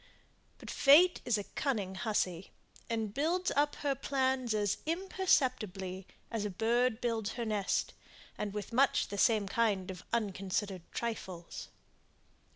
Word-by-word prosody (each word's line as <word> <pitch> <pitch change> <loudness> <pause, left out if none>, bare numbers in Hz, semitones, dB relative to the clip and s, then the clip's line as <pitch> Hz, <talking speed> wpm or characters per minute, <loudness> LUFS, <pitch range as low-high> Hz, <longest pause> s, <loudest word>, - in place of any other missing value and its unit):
But - - -8
fate 330 +6 +6
is 235 -3 +2
a 205 - -3
cunning 210 -6 -2
hussy, 190 -3 -1 0.4
and 220 -3 -2
builds 345 +7 +1
up 290 +1 +2
her 280 - +3
plans 260 -3 0
as 205 -2 +1
imperceptibly 255 - 0 0.2
as 225 -3 -1
a 210 - -1
bird 230 +4 +1
builds 225 -3 -1
her 235 -1 -3
nest; 210 -3 0 0.4
and 210 -1 -3
with 210 +2 -6
much 270 +3 +3
the 200 - -4
same 215 -4 +3
kind 195 -3 +1
of 180 - -9
unconsidered 195 -4 -2
trifles. 190 -7 -5
220 Hz, 135 wpm, -32 LUFS, 195-260 Hz, 0.4 s, fate